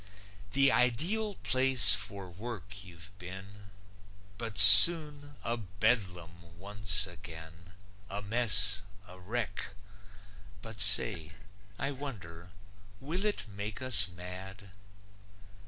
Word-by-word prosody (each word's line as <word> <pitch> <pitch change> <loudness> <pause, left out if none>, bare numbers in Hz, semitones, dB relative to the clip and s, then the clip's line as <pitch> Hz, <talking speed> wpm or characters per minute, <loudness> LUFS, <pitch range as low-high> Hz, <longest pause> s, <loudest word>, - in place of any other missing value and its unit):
The 135 -1 +2
ideal 180 - -2
place 130 -5 +2
for 100 -3 -5
work 100 +1 -13
you've 90 +1 -13
been, 95 +2 -14 0.7
But 115 -2 -9
soon 145 - +8
a 120 +1 -6
Bedlam 90 -5 -6
once 100 0 -2
again, 85 -1 -14 0.3
A 100 +1 -10
mess, 105 -2 0 0.3
a 90 +1 -18
wreck. 105 0 -9 0.9
But 110 -2 -13
say, 90 -5 +2 0.4
I 140 - -7
wonder 90 -12 -13 0.5
will 165 +8 -6
it 210 - -5
make 105 +1 -10
us 115 -7 -1
mad. 95 +3 -13
100 Hz, 100 wpm, -26 LUFS, 90-120 Hz, 0.9 s, soon